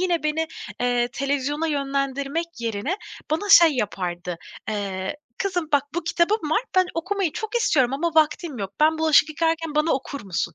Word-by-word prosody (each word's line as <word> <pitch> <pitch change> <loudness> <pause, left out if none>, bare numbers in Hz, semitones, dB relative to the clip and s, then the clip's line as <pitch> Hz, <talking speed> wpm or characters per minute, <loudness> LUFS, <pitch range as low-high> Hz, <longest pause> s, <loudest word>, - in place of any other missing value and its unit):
yine 355 -2 +1
beni, 305 +1 0 0.3
eee, 245 -1 +1
televizyona 285 +3 -1
yönlendirmek 280 +2 -1
yerine 230 - -2 0.3
bana 325 +7 -1
şey 335 -4 +9
yapardı, 180 -7 -3 0.3
eee, 200 +1 -3 0.2
"Kızım, 360 -5 -1
bak 285 - +4
bu 345 - -2
kitabım 340 0 +1
var, 420 - +2
ben 370 -1 +5
okumayı 370 0 -1
çok 435 +7 -5
istiyorum 270 - +2
ama 340 +5 0
vaktim 310 -3 +2
yok. 195 -1 -4
Ben 315 +1 +4
bulaşık 315 -1 +5
yıkarken 325 0 -1
bana 305 +2 +2
okur 275 +1 -3
musun?" 170 -3 -2
300 Hz, 160 wpm, -24 LUFS, 255-330 Hz, 0.3 s, şey